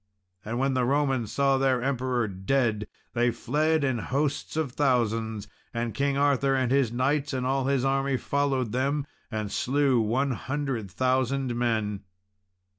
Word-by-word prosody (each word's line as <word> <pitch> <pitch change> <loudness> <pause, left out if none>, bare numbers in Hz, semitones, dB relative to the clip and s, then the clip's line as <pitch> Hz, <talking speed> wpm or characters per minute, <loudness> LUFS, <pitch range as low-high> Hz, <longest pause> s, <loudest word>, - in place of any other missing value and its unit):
And 115 +3 -3
when 135 +1 +1
the 130 -1 +1
Romans 135 -3 +1
saw 135 -1 +2
their 130 -2 +2
Emperor 130 -3 0
dead 105 +2 0 0.3
they 120 0 +2
fled 155 +6 +1
in 130 -4 +1
hosts 140 +6 -2
of 155 -5 0
thousands; 115 -6 0 0.3
and 115 -1 -2
King 140 +4 0
Arthur 140 -1 +2
and 130 -2 +1
his 135 -4 +3
knights, 140 +4 0
and 130 -1 -1
all 135 0 +1
his 135 -1 +1
army 135 0 +1
followed 135 -4 0
them, 140 +4 0 0.2
and 110 -2 -3
slew 135 -1 +2
one 130 +6 +1
hundred 130 -3 -3
thousand 130 +3 0
men. 110 -4 0
130 Hz, 150 wpm, -27 LUFS, 120-140 Hz, 0.3 s, his